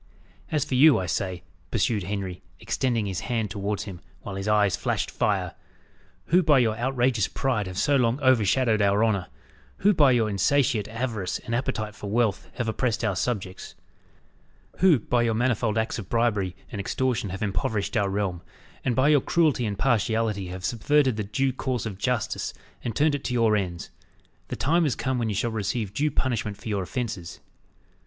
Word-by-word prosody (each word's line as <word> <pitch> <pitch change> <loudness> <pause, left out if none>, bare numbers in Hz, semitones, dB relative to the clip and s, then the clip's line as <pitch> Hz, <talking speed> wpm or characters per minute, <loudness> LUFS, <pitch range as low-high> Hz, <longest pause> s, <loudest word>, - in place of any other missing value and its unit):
"As 150 -2 +1
for 150 - -5
you, 145 +3 +7
I 95 - -2
say," 90 +1 -2 0.3
pursued 115 -1 +1
Henry, 95 -1 -4 0.2
extending 120 -5 -1
his 95 -4 -3
hand 110 +1 -2
towards 100 +1 -2
him, 90 -4 -9 0.2
while - - -6
his 95 +1 -4
eyes 105 -3 +3
flashed - - -2
fire, - - 0 0.7
"who 180 +3 +4
by 155 -5 +4
your 115 -4 +2
outrageous 120 -3 +1
pride 120 -7 -1
have 90 -1 -7
so 145 +4 +3
long 120 +1 +1
overshadowed 120 -3 +3
our 100 +2 +3
honour 100 -5 0 0.5
who 205 +2 +4
by 150 -6 +5
your 115 -3 +3
insatiate 110 +2 +1
avarice 110 -5 -3
and 115 - -4
appetite 115 -4 -2
for 105 0 -7
wealth 110 -2 0
have 120 -3 -2
oppressed 115 +1 -1
our 105 -4 +1
subjects 95 -3 -3 1.0
who 180 -5 +5
by 120 +1 0
your 115 -2 +1
manifold 115 -2 +1
acts 110 +1 -1
of 95 - -8
bribery 105 -6 +1 0.2
and 105 - -3
extortion 125 0 -1
have 95 +3 -4
impoverished 100 +2 -1
our 100 -3 +2
realm, 95 -3 -2 0.4
and 125 - 0
by 130 +3 +3
your 150 -2 +5
cruelty 150 -8 +2
and 100 -1 -3
partiality 110 -4 +1
have 90 +1 -6
subverted 130 +2 +2
the 105 - -2
due 130 +6 0
course 130 -2 -2
of 100 -3 -6
justice 125 -2 -1 0.3
and 115 -2 -3
turned 150 0 +3
it 145 - -3
to 125 - -2
your 115 -2 +3
ends 90 -4 -3 0.6
the - - -4
time 170 +4 +2
is 135 - 0
come 130 -2 -1
when 115 -2 0
you 105 - -2
shall 115 +4 0
receive 105 -1 -2
due 150 +6 +1
punishment 115 -7 -1
for 105 +2 -8
your 100 -2 0
offences." 100 -2 -4
110 Hz, 185 wpm, -26 LUFS, 100-130 Hz, 1.0 s, you